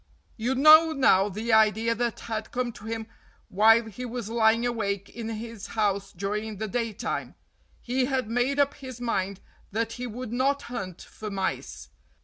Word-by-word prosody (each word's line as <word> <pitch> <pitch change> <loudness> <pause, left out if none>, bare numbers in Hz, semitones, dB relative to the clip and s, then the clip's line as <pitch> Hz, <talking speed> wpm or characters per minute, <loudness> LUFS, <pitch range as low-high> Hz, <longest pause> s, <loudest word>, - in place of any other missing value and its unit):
You 245 +4 -1
know 310 +4 +8
now 210 -8 +4
the 220 +4 -2
idea 220 +1 +4
that 235 0 -2
had 220 -1 -4
come 250 -1 -1
to 215 -2 -13
him 225 0 -4 0.4
while 225 +4 +5
he 225 +3 -8
was 240 -3 -5
lying 230 0 +3
awake 200 -4 -2
in 225 -1 -6
his 225 -1 -6
house 200 -2 0
during 210 +3 -3
the 220 +2 -3
daytime. 230 -1 -3 0.5
He 255 +1 0
had 260 -3 -1
made 245 +5 0
up 285 0 +3
his 260 -3 -9
mind 200 -5 -2 0.3
that 225 +2 -1
he 250 +1 -5
would 240 0 -6
not 275 +3 +1
hunt 195 -8 -6
for 215 - -8
mice. 195 -1 -4
225 Hz, 165 wpm, -27 LUFS, 210-245 Hz, 0.5 s, know